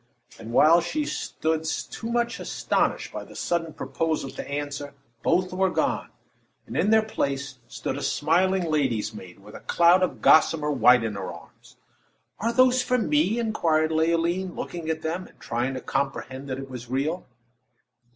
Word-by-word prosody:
And 115 +1 -8
while 165 +7 +6
she 295 - -2
still 160 - -2
stood 160 - -3
too 230 +1 -5
much 235 -1 0
astonished - - -1
by - - -5
the - - -14
sudden 165 -2 -1
proposal 155 -4 -2
to - - -7
answer, 145 0 -4 0.3
both 180 +5 +1
were 190 +1 +2
gone, - - -1 0.6
and - - -8
in 205 - +2
their 220 0 +5
place 140 -9 -3
stood 135 - -4
a - - -7
smiling 180 +7 +2
lady's 130 -9 0
maid, 90 -4 -11
with 105 +1 -14
a - - -8
cloud 175 +2 +4
of 185 - 0
gossamer 155 -1 +4
white 125 -2 +5
in 110 -2 -2
her 100 -2 -5
arms. 85 -1 -15 0.6
"Are 230 +2 0
those 255 +1 +4
for 250 - +1
me?" 270 -1 +2
inquired 165 -9 +1
Leoline, 170 +3 +1
looking 170 -2 -5
at 160 0 -2
them, 170 +3 -3
and - - -22
trying 120 +3 -2
to 130 - -5
comprehend 135 -1 -3
that 130 - -3
it 135 0 -7
was 125 -2 -8
all 125 - -7
real. 155 +7 -1
160 Hz, 175 wpm, -25 LUFS, 135-185 Hz, 0.6 s, while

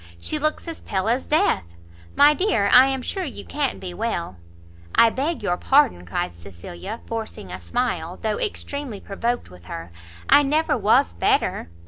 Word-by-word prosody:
She 305 - -3
looks 305 +3 -1
as 330 - -6
pale 190 +1 -2
as 245 +3 0
death. 295 - +1 0.4
My 290 +1 +7
dear, 295 - +1
I 255 +2 +9
am 265 -1 -2
sure 380 +7 -2
you 255 - -7
can't 290 -2 -2
be 180 -2 -6
well?" 175 - -3 0.6
"I 230 - +6
beg 300 +8 -2
your 175 - 0
pardon," 265 - +3
cried 85 - -2
Cecilia, 85 - -9
forcing 220 - -6
a 90 - -6
smile, 175 - -2
though 215 -1 -2
extremely 280 - -3
provoked 235 - -3
with 90 -1 -15
her; 85 0 -7 0.4
"I - - +7
never 300 +3 +1
was 205 - +3
better." 85 0 0
225 Hz, 165 wpm, -23 LUFS, -, 0.6 s, I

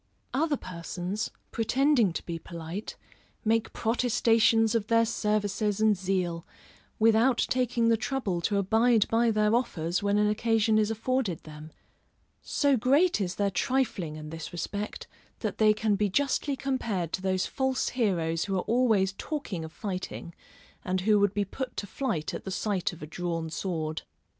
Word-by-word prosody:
Other 290 +2 +1
persons, 180 +3 -4 0.2
pretending 245 -1 +2
to - - -5
be 170 -1 -4
polite, 170 +5 -7 0.5
make 225 +1 +1
protestations 225 -1 +3
of 220 -3 0
their 230 0 +4
services 210 -1 0
and 215 -1 +4
zeal, 180 -3 -1 0.5
without 225 +3 +4
taking 245 -2 +1
the 230 - +4
trouble 215 -8 -2
to 200 +4 0
abide 220 +3 +3
by 230 +1 +3
their 215 0 +2
offers 185 -7 0
when 200 0 +1
an 210 0 +3
occasion 220 0 +2
is 215 0 +2
afforded 225 - -1
them: 155 0 -11 0.7
so 285 -2 +2
great 275 - +3
is 185 -1 -2
their 200 -1 0
trifling 210 - -1
in 155 0 -8
this 165 -1 -7
respect 200 +4 -4 0.4
that - - -3
they 215 -1 +6
can 215 0 +1
be 205 0 +1
justly 280 +5 0
compared 230 - -2
to - - -1
those 185 -1 0
false 265 -1 -1
heroes 170 -9 0
who 195 - -2
are 185 - +1
always 220 -6 +2
talking 250 - -4
of 160 - -7
fighting, 185 -4 -5 0.5
and 185 0 -1
who 210 +2 +4
would 205 0 +2
be 205 -1 +1
put 260 +6 -6
to - - -2
flight 190 - -3
at - - -5
the - - -5
sight 190 -1 -1
of 175 -3 -11
a - - -3
drawn 165 0 -4
sword. 160 -3 -3
210 Hz, 160 wpm, -28 LUFS, 180-230 Hz, 0.7 s, they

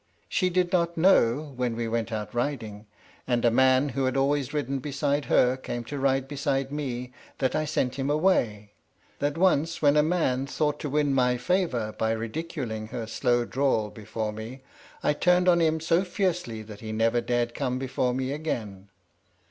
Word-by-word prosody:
She 185 -3 +1
did 180 0 +1
not 170 -2 +1
know, 150 -5 +3
when 125 -2 -1
we 115 0 -2
went 115 +1 -2
out 105 -2 -4
riding, 115 -5 -3 0.4
and 120 -1 +1
a 120 - +5
man 130 +3 +4
who 135 +1 -1
had 130 +1 0
always 140 0 +1
ridden 140 -2 -2
beside 145 +1 -1
her 125 +1 +3
came 120 -2 -5
to 140 +5 -6
ride 135 -1 +1
beside 135 -1 -1
me, 125 -4 -4 0.2
that 130 -2 0
I 155 - 0
sent 135 -3 -1
him 135 +1 -1
away; 120 - +1 0.5
that 145 +2 -1
once 165 -3 +2
when 145 -1 +4
a 150 - +6
man 150 -5 0
thought 150 +1 -1
to 150 - -4
win 145 0 +1
my 125 -2 +2
favour 130 - 0
by 110 0 0
ridiculing 115 -2 -4
her 115 +1 -5
slow 120 +1 +1
drawl 125 -6 0
before 110 0 -4
me 115 +5 -8 0.4
I - - +3
turned 180 +3 +3
on 170 -1 +5
him 160 -1 +2
so 165 +3 +2
fiercely 180 - -2
that 105 -1 -11
he 110 -1 -6
never 115 +2 +2
dared 120 -1 -1
come 125 -2 -2
before 130 -1 -1
me 130 0 -2
again. 110 -10 -4
130 Hz, 180 wpm, -27 LUFS, 115-150 Hz, 0.5 s, a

